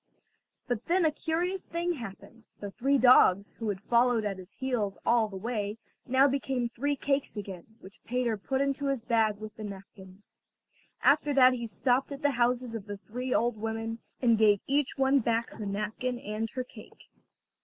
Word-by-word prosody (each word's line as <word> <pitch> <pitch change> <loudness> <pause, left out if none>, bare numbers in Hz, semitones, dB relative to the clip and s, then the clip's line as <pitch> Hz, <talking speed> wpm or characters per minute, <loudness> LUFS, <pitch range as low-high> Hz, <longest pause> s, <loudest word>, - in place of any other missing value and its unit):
But 245 -2 -3
then 350 0 +3
a 315 - +4
curious 345 +5 -2
thing 345 +1 -1
happened; 230 - -10
the 205 -1 -6
three 275 +6 +1
dogs, 205 -6 +5
who 225 -2 -2
had 195 -2 -2
followed 235 -1 +3
at 195 -2 -3
his 185 +2 -11
heels 230 -7 -2
all 235 -2 +3
the 200 - -10
way, 210 0 -3 0.3
now 265 +2 +5
became 265 -3 -1
three 285 +5 -1
cakes 275 -3 -1
again, 190 -4 -7
which 190 +2 -14
Peter 245 -2 0
put 265 +6 -2
into 275 0 0
his 270 -4 -1
bag 225 -3 +2
with 215 0 -9
the 220 - -8
napkins. 195 -1 -11 0.7
After 290 -2 +4
that 255 -1 +7
he 235 -2 -4
stopped 255 +5 0
at 280 0 -7
the 290 - +4
houses 245 -1 0
of 220 -2 -6
the 205 0 -5
three 250 +5 -6
old 240 -2 +1
women, 225 +1 -4 0.2
and 230 -3 +4
gave 210 -2 +5
each 280 +1 0
one 270 +1 +4
back 230 -1 0
her 210 - -6
napkin 215 +5 -3
and 215 0 -4
her 255 +2 -4
cake. 250 - -15
235 Hz, 185 wpm, -29 LUFS, 210-265 Hz, 0.7 s, that